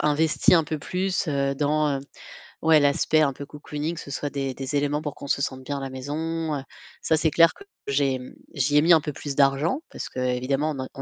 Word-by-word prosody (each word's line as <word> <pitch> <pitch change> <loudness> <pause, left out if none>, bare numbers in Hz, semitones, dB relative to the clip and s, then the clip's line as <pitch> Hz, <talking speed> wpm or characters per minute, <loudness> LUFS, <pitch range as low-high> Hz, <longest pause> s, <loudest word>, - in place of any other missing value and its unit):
investi 150 +3 +3
un 165 -2 +4
peu 155 0 -3
plus, 185 +1 -2
heu, 140 -1 0
dans 145 0 +1 0.6
ouais 160 -1 +6
l'aspect 145 +2 +3
un 140 -2 +2
peu 140 - -7
cocooning, 150 +2 -5
ce 145 - -9
soit 145 +1 -3
des 135 -2 -3
des 135 +2 -4
éléments 145 +1 0
pour 150 -2 -4
qu'on - - -9
se 140 - +1
sente 130 -1 -3
bien 145 +2 -3
à - - -6
la 135 - -4
maison, 155 +4 -3
heu. 135 - -4 0.4
Ça, 160 - +2
c'est 160 0 +2
clair 165 +2 +5
que 400 - -14 0.2
j'ai, 140 -1 +1
hem 125 0 -7 0.2
j'y 145 +2 +2
ai - - +5
mis 170 +2 +7
un 160 - +5
peu 150 - -4
plus 140 0 -6
d'argent, 140 - +2
parce - - -6
qu'évidemment, 130 +4 -1
on 130 - -4
145 Hz, 225 wpm, -25 LUFS, 135-155 Hz, 0.6 s, mis